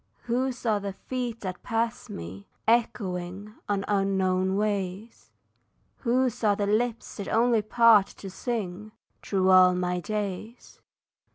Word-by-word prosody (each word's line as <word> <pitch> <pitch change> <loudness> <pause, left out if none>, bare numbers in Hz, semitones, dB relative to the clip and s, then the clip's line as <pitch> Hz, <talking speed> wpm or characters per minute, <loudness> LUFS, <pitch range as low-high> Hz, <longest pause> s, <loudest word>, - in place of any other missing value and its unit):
Whose 245 +1 -2
are 215 -3 +2
the 200 -1 -5
feet 245 +1 -5
that 185 -2 -5
pass 230 -1 -2
me, 90 +4 -8 0.2
echoing 200 -4 0 0.2
On 200 -1 0
unknown 190 -1 +1
ways? 205 +1 -3 0.7
Whose 250 -1 0
are 205 -2 +4
the 205 - -1
lips 225 +3 -1
that 200 - -5
only 230 0 +3
part 215 -1 +5
to 195 - -10
sing 210 -1 -4 0.3
Through 190 -1 +1
all 185 -1 +7
my 180 0 -1
days? 210 +3 -5
205 Hz, 125 wpm, -27 LUFS, 185-230 Hz, 0.7 s, all